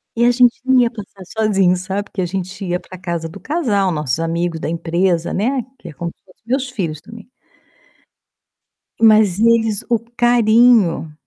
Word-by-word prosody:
E 235 +1 +2
a 240 - +5
gente 245 -1 +3
não 260 -1 +4
ia 240 -1 +3
passar 200 -4 -11
sozinho, 195 -3 +1
sabe, 195 +3 -4
que 190 - -3
a - - 0
gente 185 +2 -5
ia 180 0 -1
para 185 - -12
casa 170 -2 -4
do 175 - -11
casal, 220 - 0
nossos 150 -3 -2
amigos 165 0 -2
da - - -4
empresa, 170 +1 -1
né, 255 +6 0 0.2
que 175 - -10
é - - -11
como 170 +3 -5
se - - -52
fosse 185 - -24
meus 260 +1 -1
filhos 175 -11 -4
também. 225 -2 -13 1.7
Mas 215 -4 +5
eles 225 -2 +2
o 235 -2 +2
carinho. 230 -8 +3
200 Hz, 175 wpm, -18 LUFS, 175-230 Hz, 1.7 s, a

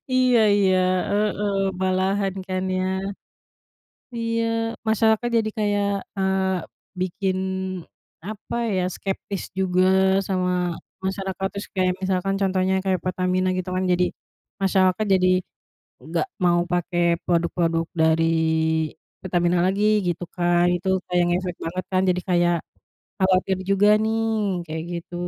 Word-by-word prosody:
Iya 255 -2 +4 0.2
iya, 190 -2 +3 0.3
heeh. 205 -1 0 0.3
Malahan, 190 +1 +1
kan, 185 0 -1
ya. 185 0 0 1.3
Iya. 230 0 -1 0.4
Masyarakat 220 +2 +2
jadi 220 -1 +1
kayak, 205 -1 +1 0.3
eee, 190 -1 +1 0.4
bikin, 185 +1 -1 0.9
apa 215 +3 -6 0.2
ya, 185 - +1
skeptis 195 0 -4 0.2
juga 185 -1 +2 0.4
sama 180 -2 0 0.3
masyarakat, 190 0 -3
terus 200 - -6
kayak 185 -1 +2
misalkan 190 +1 0
contohnya 190 0 +1
kayak 190 -2 +1
Pertamina 185 0 0
gitu 185 0 -3
kan, 185 - 0
jadi 180 0 +3 0.6
masyarakat 190 +1 +2
jadi 185 -1 +3 0.8
nggak - - -1 0.2
mau 175 -1 +4
pakai 175 0 0 0.2
produk-produk 170 -1 +1
dari 160 0 +3 1.0
Pertamina 175 -1 +1
lagi, 195 +3 +1 0.2
gitu, 175 0 -2
kan. 175 -1 +2
Itu 180 +2 -3 0.2
kayak 180 -1 +2
ngefek 180 0 -1
banget 180 +3 -3
kan, 185 0 +3
jadi 180 0 +2
kayak 175 -1 +3 0.6
khawatir 190 0 +2
juga 195 +1 +4
nih, 225 +1 0 0.4
kayak 160 0 -4 0.2
gitu. 170 - -14
185 Hz, 120 wpm, -23 LUFS, 180-195 Hz, 1.3 s, Iya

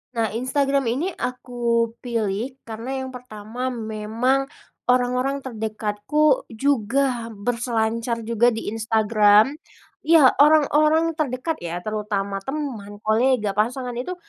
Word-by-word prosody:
Nah, 225 -2 0
Instagram 275 +3 0
ini 290 +11 -1
aku 240 -4 -1
pilih 230 +1 -2
karena 245 +4 -5
yang 260 - -6
pertama 245 0 -6
memang 230 +3 -1 0.4
orang-orang 250 +2 +1
terdekatku 220 - 0
juga 245 0 0
berselancar 230 +1 -1
juga 235 +1 +2
di 225 - -4
Instagram. 215 +1 +4 0.6
Ya, 315 -6 +7
orang-orang 310 +2 +4
terdekat 290 +2 -2
ya, 175 +1 -5
terutama 205 -2 -2
teman, 230 -4 -5
kolega, 220 -1 +2
pasangan, 245 +5 -1
itu 360 +9 -4
240 Hz, 105 wpm, -23 LUFS, 215-270 Hz, 0.6 s, Ya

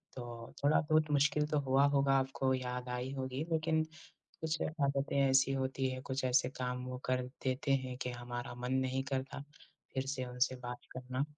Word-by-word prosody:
तो 120 -2 -7
थोड़ा-बहुत 155 +1 +4
मुश्किल 150 +1 +3
तो 150 -1 +1
हुआ 135 0 +4
होगा, 140 -1 +3
आपको 135 0 0
याद 125 -1 -3
आई 125 +1 -2
होगी। 130 +1 -2
लेकिन 160 0 +2 0.6
कुछ 160 0 -1
आदतें 140 -3 0
ऐसी 135 0 +5
होती 130 0 0
हैं, 130 0 -5
कुछ 130 0 -2
ऐसे 125 0 +4
काम 125 0 -2
वो 125 0 -4
कर 130 0 +1 0.2
देते 130 +1 +1
हैं 130 -1 -4
कि 125 - -2
हमारा 120 0 -5
मन 125 +1 -3
नहीं 130 0 +1
करता 135 +1 -2 0.5
फिर 130 0 -1
से 135 -1 -2
उनसे 125 +1 +1
बात 125 -1 -7
करना। 130 +1 -2
130 Hz, 175 wpm, -34 LUFS, 125-140 Hz, 0.6 s, ऐसी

